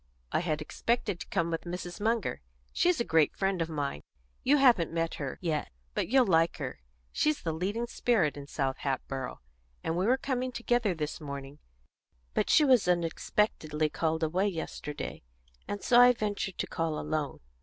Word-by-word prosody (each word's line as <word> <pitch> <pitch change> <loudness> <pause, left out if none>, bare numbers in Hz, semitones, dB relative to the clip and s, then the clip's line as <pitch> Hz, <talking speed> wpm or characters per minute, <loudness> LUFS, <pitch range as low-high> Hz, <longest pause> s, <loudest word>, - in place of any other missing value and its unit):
"I - - +2
had 155 -3 -1
expected 220 +1 -1
to - - -7
come 170 0 0
with 165 - -1
Mrs. 175 +2 -6
Munger 220 - 0 0.3
she's 355 -2 +3
a - - +2
great 160 -7 +3
friend 195 -2 0
of 165 - -1
mine; 145 - -3 0.4
you 290 +3 +5
haven't 240 - +5
met 165 0 -1
her 135 -2 -3
yet, 155 -3 -1 0.2
but - - -1
you'll 260 +2 +5
like 165 -4 +3
her; 135 -4 -5 0.3
she's 305 -1 +1
the 165 - -1
leading 200 +8 -1
spirit 225 -10 +1
in 140 -1 -8
South 135 -2 -1
Hatboro' 135 - -3 0.4
and 165 - -1
we 185 +4 +1
were 255 +2 +4
coming 255 -1 -2
together 235 -5 +1
this 155 0 -4
morning; 140 0 -7 0.7
but - - 0
she 305 - +6
was 255 -8 +5
unexpectedly 165 -2 +1
called 160 0 0
away 180 +6 +1
yesterday, 160 -5 -5 0.5
and 205 - -4
so 240 -1 +6
I 250 0 +8
ventured 205 -4 -3
to - - -1
call 165 -3 -2
alone." 150 -4 -2
170 Hz, 175 wpm, -30 LUFS, 155-230 Hz, 0.7 s, I